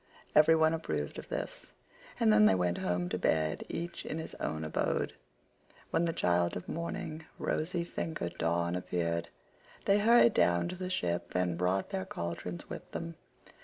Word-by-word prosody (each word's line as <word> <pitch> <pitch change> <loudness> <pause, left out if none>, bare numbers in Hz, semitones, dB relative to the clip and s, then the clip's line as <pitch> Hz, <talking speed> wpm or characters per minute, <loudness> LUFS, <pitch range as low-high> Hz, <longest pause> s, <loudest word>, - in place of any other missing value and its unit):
Every 155 +2 +7
one 160 0 +4
approved 75 - -3
of - - -10
this, - - -5 0.5
and 110 - +5
then 105 0 +7
they 95 - +5
went 90 -1 0
home 90 0 0
to 90 - -2
bed 80 -3 +1
each 170 +1 -4
in 155 - -4
his 160 - -5
own 80 0 -2
abode. 80 - 0 0.8
When 170 - +2
the 165 - +1
child 85 - +1
of 90 - -8
morning, 160 -1 -4
rosy 170 +2 -1
fingered 160 - -4
Dawn, 85 +1 +1
appeared 85 -2 -1 0.6
they 200 +1 +5
hurried 230 +1 +6
down 85 - +3
to 185 - -4
the 185 0 -4
ship 85 - -1
and 90 -1 +1
brought 90 +3 0
their 95 - -2
cauldrons 85 0 -5
with - - -8
them. 85 0 -4
90 Hz, 165 wpm, -32 LUFS, -, 0.8 s, Every